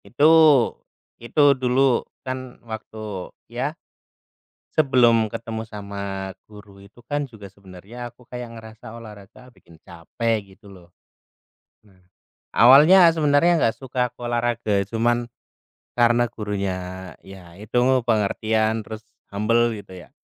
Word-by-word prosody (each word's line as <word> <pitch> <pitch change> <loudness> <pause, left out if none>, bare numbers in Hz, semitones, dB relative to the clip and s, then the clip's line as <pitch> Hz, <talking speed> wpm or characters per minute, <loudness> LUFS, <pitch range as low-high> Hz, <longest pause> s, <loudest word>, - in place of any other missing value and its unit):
Itu 145 +6 +3 0.9
itu 145 +4 +3
dulu, 130 -1 +2 0.2
kan 130 -1 -6
waktu 110 -3 -7 0.2
ya? 135 +7 -4 1.0
Sebelum 120 -6 +4
ketemu 110 0 -5
sama 100 -2 -6 0.2
guru 105 -2 -15
itu 100 +4 -19
kan, 145 +1 -2
juga, 105 -3 -12
sebenarnya 100 +6 -11
aku 120 +1 -23
kayak 120 -2 -8
ngerasa 110 0 -12
olahraga 110 +3 -14
bikin 85 -1 -20
capek, 100 +4 -4
gitu 105 +2 -22
lo. 90 -3 -15 1.0
Nah. 95 -3 -25 0.5
Awalnya 155 +9 +7
sebenarnya 160 +2 +2
nggak 115 - +1
suka 125 -2 -2
aku, 125 - -11
olahraga. 120 -4 0
Cuman, 120 +2 0 0.7
karena 120 0 +3
gurunya, 95 -4 -5
ya 95 -3 -14
itu, 110 +3 -4 0.3
pengertian, 110 0 0
terus 110 +1 -9 0.2
humble, 115 +3 +1
gitu 100 -2 -12
ya. 90 - -13
115 Hz, 115 wpm, -22 LUFS, 100-125 Hz, 1.0 s, Awalnya